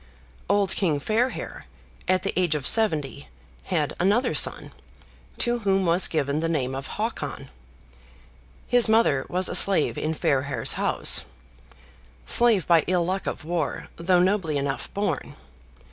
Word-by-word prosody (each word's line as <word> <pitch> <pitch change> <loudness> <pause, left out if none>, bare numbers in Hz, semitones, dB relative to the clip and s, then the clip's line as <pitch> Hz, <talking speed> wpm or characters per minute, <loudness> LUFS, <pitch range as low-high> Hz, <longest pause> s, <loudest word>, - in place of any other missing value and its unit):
Old 200 -1 +2
King 160 -7 0
Fairhair, 225 - -2 0.4
at 185 0 +1
the 195 - -2
age 175 -4 +1
of 145 -3 -4
seventy, 150 - +1 0.4
had 155 -6 -1
another 205 +8 +2
son, - - 0 0.7
to 240 -1 0
whom 195 -3 +1
was 175 +2 +3
given 145 -2 -1
the 165 +1 -1
name 135 -5 -1
of 135 0 -5
Hakon. 145 - -4 1.1
His 245 -2 +3
mother 220 -12 +2
was 185 +1 +1
a - - -3
slave 195 -6 +2
in 155 +1 -2
Fairhair's 140 -1 0
house; - - 0 1.0
slave 225 - +4
by 165 -2 +4
ill 180 -1 +1
luck 190 +2 -3
of - - -5
war, 165 -2 -3
though 180 +1 +2
nobly 180 -5 +1
enough 140 -1 -3
born. 200 +1 -3
175 Hz, 140 wpm, -24 LUFS, 150-200 Hz, 1.1 s, slave